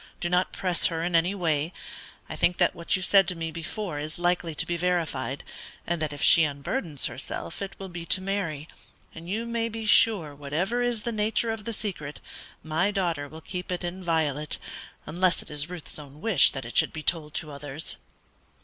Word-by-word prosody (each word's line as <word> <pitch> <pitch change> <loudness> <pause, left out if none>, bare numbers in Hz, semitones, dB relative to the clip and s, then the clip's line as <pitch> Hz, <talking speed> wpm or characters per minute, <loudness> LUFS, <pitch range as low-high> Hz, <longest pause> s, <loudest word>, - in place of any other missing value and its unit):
Do 175 - -2
not 180 +1 +3
press 180 -2 +2
her 165 -1 -2
in 175 0 0
any 175 +4 +3
way. 160 -2 0 0.5
I - - -6
think 175 - +2
that - - +3
what 170 +3 0
you 185 - -1
said 195 -1 +5
to 180 - +1
me 165 -1 -3
before 165 0 -4
is 155 +2 -5
likely 175 -2 0
to - - +1
be 175 - -1
verified, 170 -6 -1 0.4
and 170 -1 -1
that 155 -2 -1
if 145 - -5
she 165 - +8
unburdens 145 - -1
herself 85 - -5
it 195 -1 -4
will 195 - -6
be 175 -2 -7
to - - +5
Mary; 185 -6 -2 0.5
and 165 +2 -9
you 220 +4 -1
may 230 -1 -1
be 225 0 -5
sure 205 -8 +5
whatever 160 +12 -1
is 240 -3 0
the 235 - -1
nature 220 +1 +1
of 225 -2 -5
the 230 - -2
secret, 175 -9 -5 0.4
my 160 +5 +1
daughter 170 -8 -1
will 160 +2 -10
keep 180 +2 -5
it 180 - -2
inviolate, 160 -5 -1 0.5
unless 180 +4 +1
it - - -11
is 150 +2 0
Ruth's 175 -3 -7
own 145 0 -12
wish 175 -8 +6
that 135 - -5
it - - -8
should 155 - +5
be 155 - -5
told 155 -3 +1
to 155 - -1
others." 145 +2 -6
170 Hz, 205 wpm, -27 LUFS, 155-190 Hz, 0.5 s, she